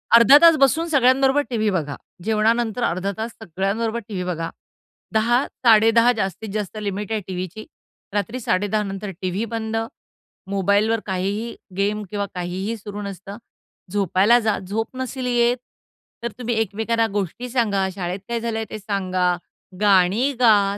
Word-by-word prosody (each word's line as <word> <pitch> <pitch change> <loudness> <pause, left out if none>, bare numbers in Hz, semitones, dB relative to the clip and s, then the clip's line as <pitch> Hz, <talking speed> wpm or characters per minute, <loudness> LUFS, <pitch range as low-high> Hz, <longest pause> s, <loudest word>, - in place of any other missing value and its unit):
अर्धा 235 +5 +9
तास 335 -1 +8
बसून 315 +5 +3
सगळ्यांबरोबर 270 -1 +4
टी-व्ही 220 -3 +1
बघा. 150 -7 -2 0.3
जेवणानंतर 225 +2 +1
अर्धा 185 +1 0
तास 225 +1 -3
सगळ्यांबरोबर 220 +4 -2
टी-व्ही 190 -4 -4
बघा. 165 -2 -3 0.6
10:00, 240 +4 +3 0.2
10:30 230 +1 +6
जास्तीत 195 +1 -3
जास्त 210 -1 -3
लिमिट 205 +1 -4
आहे 215 -1 0
टीव्हीची. 185 +3 -5 0.5
रात्री 210 +5 -2
10:30 205 -1 0
नंतर 195 0 -5
टी-व्ही 185 +5 -1
बंद. 220 0 -3 0.7
मोबाईलवर 200 +3 +2
काहीही 200 +4 -2 0.2
गेम 205 +2 0
किंवा 205 -1 -2
काहीही 185 +5 -3
सुरू 205 0 -7
नसतं. 200 +1 -7 0.5
झोपायला 200 +4 +4
जा 220 -2 0
झोप 215 +6 -4
नसेल 260 0 -4
येत, 240 0 +2 0.7
तर 235 - -2
तुम्ही 240 -1 -1
एकमेकांना 225 +2 0
गोष्टी 205 +5 -3
सांगा, 205 -6 +1
शाळेत 180 0 -3
काय 235 0 -1
झालंय 225 -1 -2
ते 215 - -6
सांगा, 185 -3 0 0.5
गाणी 205 +6 +4
गा, 205 -4 +4
215 Hz, 140 wpm, -22 LUFS, 195-230 Hz, 0.7 s, अर्धा